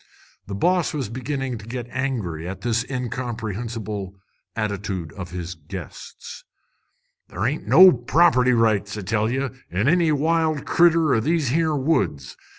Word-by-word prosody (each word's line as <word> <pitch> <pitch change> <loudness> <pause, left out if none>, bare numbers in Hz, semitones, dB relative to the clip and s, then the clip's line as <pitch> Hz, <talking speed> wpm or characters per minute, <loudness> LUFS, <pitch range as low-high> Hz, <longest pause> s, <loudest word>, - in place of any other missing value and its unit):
The 100 - -5
boss 175 - +1
was 135 -8 -3
beginning 130 0 -4
to 105 - -12
get 120 0 -5
angry 110 - -3
at 95 - -6
this 115 -1 0
incomprehensible 115 -5 -4 0.4
attitude 100 -6 -3
of 95 -2 -7
his 90 0 -5
guests. 85 +1 -10 0.9
"Ther' 100 - -3
ain't 145 +5 -2
no 185 +2 +9
property 125 0 +3
rights, 110 -3 +1
I - - -4
tell 110 +3 0
ye, 135 +3 -1 0.2
in 95 +8 0
any 170 0 +3
wild 155 0 +1
critter 165 -4 +4
o' - - +3
these 155 +2 0
here 160 +2 +1
woods. 130 - -1
120 Hz, 145 wpm, -23 LUFS, 100-145 Hz, 0.9 s, no